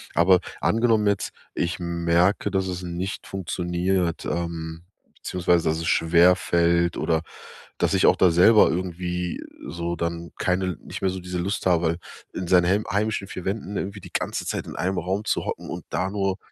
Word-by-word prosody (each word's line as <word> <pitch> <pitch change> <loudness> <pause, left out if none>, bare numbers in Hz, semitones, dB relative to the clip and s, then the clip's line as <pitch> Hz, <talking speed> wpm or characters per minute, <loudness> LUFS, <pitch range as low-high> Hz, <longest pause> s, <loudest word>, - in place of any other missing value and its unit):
Aber 90 +2 +5 0.2
angenommen 115 -2 +3
jetzt, 100 -1 0 0.2
ich 85 +2 -2
merke, 85 +3 +1
dass 95 -1 0
es 90 -1 -4
nicht 90 +2 -4
funktioniert, 90 -1 -1
ähm, 85 -1 -4 0.3
beziehungsweise 90 -2 +1
dass 80 - 0
es 85 - -3
schwer 85 +3 +5
fällt 85 -1 +2
oder 80 -1 +1 0.6
dass - - +1
ich - - +4
auch - - +5
da 90 - +5
selber 95 +6 +6
irgendwie 90 0 -3 0.3
so 85 0 -3
dann 85 0 -3
keine 90 -1 0
nicht - - -8
mehr 95 - +2
so 95 0 -5
diese 90 0 -6
Lust 95 +3 -2
habe, 85 -2 +2 0.3
in 90 - -4
seinen 90 0 +5
hem 100 +4 +2
heimischen 105 -1 -1
4 90 - -7
Wänden 100 0 -3
irgendwie 100 +1 -4
die - - -13
ganze - - -2
Zeit - - -3
in - - -7
einem 95 +2 -1
Raum 95 +5 -2
zu - - 0
hocken - - -5
und - - -6
da 95 - -1
nur 95 -1 -1
90 Hz, 180 wpm, -24 LUFS, 85-95 Hz, 0.6 s, selber